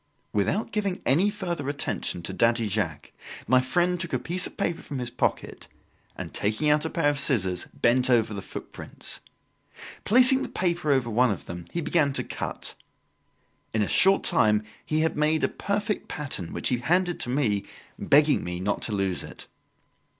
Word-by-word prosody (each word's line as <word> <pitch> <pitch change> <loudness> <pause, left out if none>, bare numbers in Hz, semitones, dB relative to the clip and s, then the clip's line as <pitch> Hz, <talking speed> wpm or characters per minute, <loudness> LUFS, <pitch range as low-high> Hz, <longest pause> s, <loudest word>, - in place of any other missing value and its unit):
Without 155 - 0
giving 200 -4 -1
any 170 +11 +3
further 175 -9 -3
attention 140 - -3
to - - -5
Daddy 115 -1 +2
Jacques, 95 -8 -2 0.4
my 130 0 +5
friend 175 +7 +1
took 170 -4 -4
a - - +3
piece 175 +9 -1
of - - -15
paper 170 - -1
from 140 - -6
his 125 -1 -3
pocket, 125 - -2 0.5
and - - -7
taking 110 +9 +1
out 150 +1 +3
a - - -1
pair 165 -3 0
of 145 - -2
scissors, 95 -11 0
bent 125 +2 +2
over 115 -3 +3
the 100 - -5
footprints. - - -7 0.8
Placing 255 +4 +6
the - - -4
paper 175 -4 0
over 130 -4 +1
one 125 +3 +3
of 100 - -3
them 85 -1 -7
he 170 - -2
began 150 -4 +2
to - - -1
cut. - - -5 1.0
In 110 - +2
a - - -1
short 195 +1 +4
time 105 - +3 0.2
he 155 0 0
had 160 - +1
made 155 +1 +1
a - - +4
perfect 205 +1 -2
pattern 135 - -5
which - - -2
he 125 - 0
handed 175 +6 +1
to - - -2
me, 120 -7 +1 0.4
begging 145 +1 +4
me 90 0 -4
not 100 +3 -1
to 110 - -1
lose 95 -6 -1
it. - - -10
135 Hz, 180 wpm, -26 LUFS, 110-170 Hz, 1.0 s, Placing